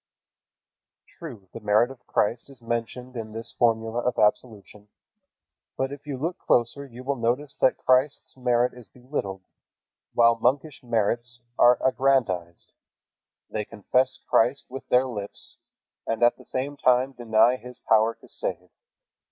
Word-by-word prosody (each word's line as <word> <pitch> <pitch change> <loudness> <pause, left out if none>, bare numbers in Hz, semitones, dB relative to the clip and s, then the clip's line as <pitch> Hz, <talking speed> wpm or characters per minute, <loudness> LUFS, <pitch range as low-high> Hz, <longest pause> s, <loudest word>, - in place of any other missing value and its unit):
True, 120 - -9
the - - -7
merit 110 +4 +3
of 135 - -15
Christ 115 +5 0
is 135 -3 -11
mentioned 120 +2 -4
in 110 -2 -6
this 115 +1 -4
formula 115 0 +2
of 125 0 -1
absolution. 105 -1 -1 0.9
But 135 +1 -1
if 145 +1 -10
you 140 -3 -3
look 165 +7 -3
closer 125 +4 +1
you 125 0 -11
will 140 +1 -1
notice 125 +5 -1
that 130 - +4
Christ's 130 +3 +1
merit 125 -1 +1
is 125 -4 -13
belittled, 100 -5 -5 0.7
while 115 -1 +5
monkish 135 +4 0
merits 120 +1 -1 0.2
are 120 +1 +7
aggrandized. 115 -11 0 0.8
They 110 - -2
confess 125 +5 0
Christ 125 +5 +2
with 135 - -8
their 125 +1 +4
lips, 105 -6 -5 0.5
and 115 +1 0
at 120 - +5
the - - -16
same 140 +3 -3
time 130 0 +3
deny 115 0 +3
His 125 -1 -10
power 115 -1 +3
to - - -19
save. - - -4
120 Hz, 145 wpm, -25 LUFS, 115-130 Hz, 0.9 s, are